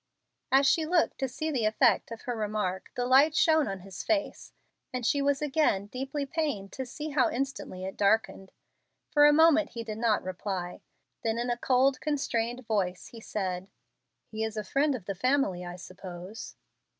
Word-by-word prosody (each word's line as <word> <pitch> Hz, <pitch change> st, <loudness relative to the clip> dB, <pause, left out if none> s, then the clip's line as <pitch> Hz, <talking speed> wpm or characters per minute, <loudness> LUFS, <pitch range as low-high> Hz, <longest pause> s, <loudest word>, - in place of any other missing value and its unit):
As 270 Hz, +1 st, +5 dB
she 320 Hz, +3 st, +4 dB
looked 335 Hz, +1 st, +1 dB
to 265 Hz, -, 0 dB
see 310 Hz, +5 st, -3 dB
the 245 Hz, -6 st, 0 dB
effect 215 Hz, -, +3 dB
of 230 Hz, -1 st, -8 dB
her 245 Hz, -, -3 dB
remark 210 Hz, -4 st, -2 dB
the 245 Hz, -, -1 dB
light 275 Hz, +5 st, +5 dB
shone 315 Hz, -1 st, +4 dB
on 195 Hz, -2 st, -4 dB
his 190 Hz, 0 st, -8 dB
face, 320 Hz, -3 st, -2 dB, 0.4 s
and 250 Hz, -2 st, -3 dB
she 285 Hz, +4 st, +2 dB
was 280 Hz, +1 st, +1 dB
again 280 Hz, -9 st, +1 dB
deeply 270 Hz, +6 st, -4 dB
pained 275 Hz, -10 st, -2 dB
to 260 Hz, -1 st, -5 dB
see 300 Hz, +5 st, -6 dB
how 280 Hz, -3 st, +2 dB
instantly 240 Hz, -8 st, -4 dB
it 190 Hz, -, -6 dB
darkened. 200 Hz, -2 st, +1 dB, 0.6 s
For 295 Hz, -1 st, +7 dB
a -, -, +7 dB
moment 320 Hz, 0 st, +4 dB
he 230 Hz, -1 st, -5 dB
did 220 Hz, -1 st, -6 dB
not 225 Hz, -2 st, +2 dB
reply; 185 Hz, -1 st, -4 dB, 0.4 s
then 225 Hz, 0 st, 0 dB
in 240 Hz, +1 st, -1 dB
a -, -, +1 dB
cold, 255 Hz, +2 st, +2 dB
constrained 250 Hz, -5 st, -1 dB
voice, 190 Hz, -5 st, -1 dB
he 230 Hz, -, -11 dB
said, 190 Hz, -3 st, -3 dB, 0.6 s
"He 220 Hz, 0 st, -4 dB
is 220 Hz, 0 st, -3 dB
a 215 Hz, -, -2 dB
friend 280 Hz, +5 st, +1 dB
of 215 Hz, -8 st, -8 dB
the 195 Hz, -, -3 dB
family, 255 Hz, -4 st, +1 dB
I 175 Hz, 0 st, -6 dB
suppose." 185 Hz, +2 st, -9 dB
240 Hz, 185 wpm, -29 LUFS, 195-280 Hz, 0.6 s, For